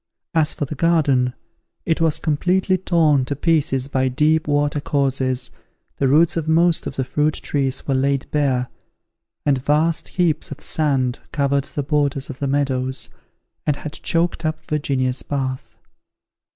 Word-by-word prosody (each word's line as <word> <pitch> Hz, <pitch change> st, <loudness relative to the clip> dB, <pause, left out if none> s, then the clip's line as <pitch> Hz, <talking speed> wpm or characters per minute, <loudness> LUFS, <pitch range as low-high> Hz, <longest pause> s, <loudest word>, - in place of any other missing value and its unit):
As 160 Hz, -2 st, +2 dB
for 145 Hz, -, -2 dB
the 140 Hz, -, -6 dB
garden, 145 Hz, -6 st, +2 dB, 0.5 s
it 165 Hz, -1 st, 0 dB
was 160 Hz, -2 st, +2 dB
completely 180 Hz, +5 st, +1 dB
torn 165 Hz, -6 st, +2 dB
to 145 Hz, -, -3 dB
pieces 145 Hz, -4 st, +1 dB
by 130 Hz, -1 st, 0 dB
deep 150 Hz, +5 st, +2 dB
water 145 Hz, 0 st, +1 dB
courses, 135 Hz, -3 st, 0 dB, 0.5 s
the 135 Hz, -, +2 dB
roots 155 Hz, +5 st, +4 dB
of 165 Hz, -2 st, -2 dB
most 165 Hz, +1 st, +3 dB
of -, -, -6 dB
the 135 Hz, -, 0 dB
fruit 150 Hz, +4 st, 0 dB
trees 135 Hz, -2 st, -2 dB
were 135 Hz, -, +1 dB
laid 135 Hz, +1 st, +1 dB
bare, 130 Hz, -4 st, +1 dB, 0.8 s
and 135 Hz, -3 st, +1 dB
vast 155 Hz, +3 st, +2 dB
heaps 170 Hz, -4 st, 0 dB
of -, -, -7 dB
sand 135 Hz, -5 st, 0 dB
covered 140 Hz, -1 st, +1 dB
the 145 Hz, -, -4 dB
borders 140 Hz, -1 st, 0 dB
of 130 Hz, -, -11 dB
the 140 Hz, -, -1 dB
meadows, 130 Hz, -2 st, -1 dB, 0.6 s
and 150 Hz, -, +3 dB
had 150 Hz, +1 st, -7 dB
choked 170 Hz, 0 st, -1 dB
up 155 Hz, 0 st, -3 dB
Virginia's 135 Hz, -4 st, 0 dB
bath. 130 Hz, -2 st, -4 dB
145 Hz, 150 wpm, -21 LUFS, 135-155 Hz, 0.8 s, roots